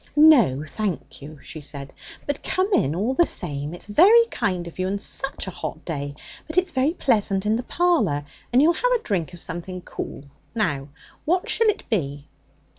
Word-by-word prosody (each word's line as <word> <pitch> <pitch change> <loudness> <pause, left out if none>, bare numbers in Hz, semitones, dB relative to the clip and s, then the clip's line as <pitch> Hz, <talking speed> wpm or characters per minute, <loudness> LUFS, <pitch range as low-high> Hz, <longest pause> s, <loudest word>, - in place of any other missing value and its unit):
'No 275 - +6
thank 195 -3 -4
you,' 150 +2 -10
she 155 - -9
said. 140 -1 -7 0.3
'But 285 -1 -3
come 380 +3 0
in, 145 - +2
all 215 +9 0
the 345 +5 +4
same. 145 +1 -3
It's - - -9
very 400 - +6
kind 185 -6 -1
of 170 +1 -10
you. 185 - 0
And 200 +1 -2
such 270 +6 -2
a 190 - -5
hot 165 -2 -6
day! 145 -3 -4 0.3
But 315 +3 -6
it's 365 0 +3
very 275 +2 +1
pleasant 205 - +1
in 215 +1 +2
the 235 - -1
parlour. 305 - +1 0.3
And 250 +3 +5
you'll 335 +3 +5
have - - 0
a 475 - 0
drink 180 -6 -1
of - - -10
something 180 +2 -5
cool. 140 - -7 0.3
Now 145 -11 0 0.4
what 360 +3 +1
shall 455 - +3
it 425 - 0
be?' 145 - -2
205 Hz, 190 wpm, -23 LUFS, -, 0.4 s, No